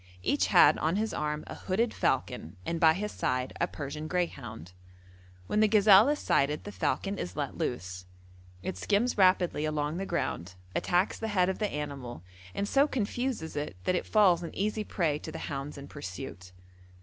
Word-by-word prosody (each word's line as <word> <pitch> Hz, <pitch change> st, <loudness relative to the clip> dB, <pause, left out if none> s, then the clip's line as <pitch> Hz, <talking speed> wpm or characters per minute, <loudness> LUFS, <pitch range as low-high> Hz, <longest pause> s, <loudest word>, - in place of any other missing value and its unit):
Each -, -, +2 dB
had -, -, +6 dB
on 160 Hz, +3 st, +1 dB
his 220 Hz, +2 st, -1 dB
arm 150 Hz, 0 st, -2 dB
a -, -, -7 dB
hooded 220 Hz, +5 st, -1 dB
falcon 85 Hz, +5 st, -1 dB
and 170 Hz, 0 st, -2 dB
by 160 Hz, -1 st, +6 dB
his 210 Hz, +4 st, -3 dB
side 125 Hz, 0 st, -1 dB
a 175 Hz, -, +3 dB
Persian 150 Hz, +1 st, -6 dB
greyhound. 135 Hz, -, -3 dB, 0.7 s
When 210 Hz, -, 0 dB
the 215 Hz, -, +6 dB
gazelle 210 Hz, +2 st, +7 dB
is 295 Hz, -, +2 dB
sighted 150 Hz, -, +1 dB
the 205 Hz, -, -7 dB
falcon 200 Hz, -1 st, -1 dB
is 90 Hz, -, -5 dB
let -, -, -3 dB
loose; 90 Hz, +2 st, -4 dB, 0.6 s
it 95 Hz, -, -4 dB
skims 210 Hz, -, +1 dB
rapidly 185 Hz, -4 st, +4 dB
along 155 Hz, +1 st, -1 dB
the 195 Hz, +1 st, -3 dB
ground, 90 Hz, +2 st, -2 dB, 0.2 s
attacks 180 Hz, +3 st, +1 dB
the 225 Hz, -, -2 dB
head 185 Hz, -4 st, +2 dB
of 190 Hz, -, -3 dB
the 210 Hz, -2 st, 0 dB
animal, 140 Hz, -, -5 dB, 0.3 s
and 200 Hz, -, -1 dB
so 275 Hz, +6 st, +4 dB
confuses 240 Hz, -, -2 dB
it 145 Hz, -8 st, -3 dB
that -, -, +1 dB
it 180 Hz, -, -1 dB
falls 190 Hz, -6 st, +4 dB
an 170 Hz, -, -7 dB
easy 215 Hz, +2 st, -1 dB
prey 160 Hz, -8 st, 0 dB
to -, -, -7 dB
the -, -, -6 dB
hounds 140 Hz, 0 st, -5 dB
in 140 Hz, 0 st, -9 dB
pursuit. 90 Hz, -8 st, -8 dB
170 Hz, 185 wpm, -29 LUFS, 140-205 Hz, 0.7 s, gazelle